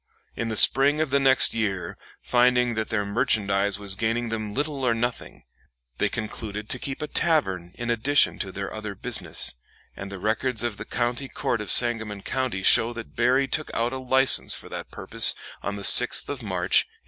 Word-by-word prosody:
In 115 - -3
the 110 - -3
spring 140 +6 +3
of 155 -3 -1
the 140 - +3
next 135 -1 +4
year, 100 -5 -3 0.3
finding 125 0 +2
that 110 -1 -3
their 105 -2 -1
merchandise 100 -3 0
was 100 -2 -3
gaining 115 +2 -2
them 110 -2 -4
little 145 +2 -3
or 120 -2 +2
nothing, 120 +1 -4 0.6
they - - +1
concluded 105 0 -6
to - - +2
keep 135 +1 -5
a - - -4
tavern 95 - 0
in 120 0 -3
addition 135 +5 +2
to 95 - -4
their 100 +1 -6
other 105 -2 -6
business, - - -1 0.4
and 95 +1 -8
the 100 - -7
records 110 +4 0
of 115 -4 -3
the - - -7
County 120 +3 -2
Court 115 - -2
of 105 - -6
Sangamon 110 -4 +2
County 130 -8 -3
show 115 +5 +5
that 115 -1 -10
Berry 130 +3 +2
took 155 +3 0
out 120 +2 -1
a 130 - -4
license 130 +1 +4
for - - -7
that - - -7
purpose - - +1 0.3
on 100 - -4
the 100 - -7
6th - - +5
of 140 -2 -5
March, 95 -5 +1
1833. - - -39
115 Hz, 195 wpm, -24 LUFS, 105-130 Hz, 0.6 s, show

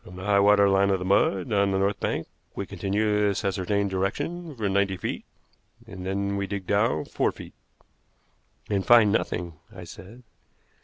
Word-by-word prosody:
From 90 - -12
the 95 - -8
high 100 -1 +3
water 100 0 +5
line 100 0 +3
of 95 -2 0
mud 95 +1 +1
on 100 -1 +3
the 95 - 0
north 100 +1 0
bank - - -2 0.3
we - - -4
continue 105 +1 -1
this 100 0 0
ascertained 100 +1 -1
direction 145 - -3
for 110 -4 -2
ninety 100 -1 0
feet, - - -5 0.6
and 90 - -9
then 100 +1 -2
we 100 0 -2
dig 100 -1 -5
down 100 -6 +1
four - - 0
feet." - - -12 1.1
"And 100 -2 -1
find 115 -2 +6
nothing," 85 -6 -2
I 95 -3 -10
said. 105 +8 -12
100 Hz, 170 wpm, -25 LUFS, 95-105 Hz, 1.1 s, find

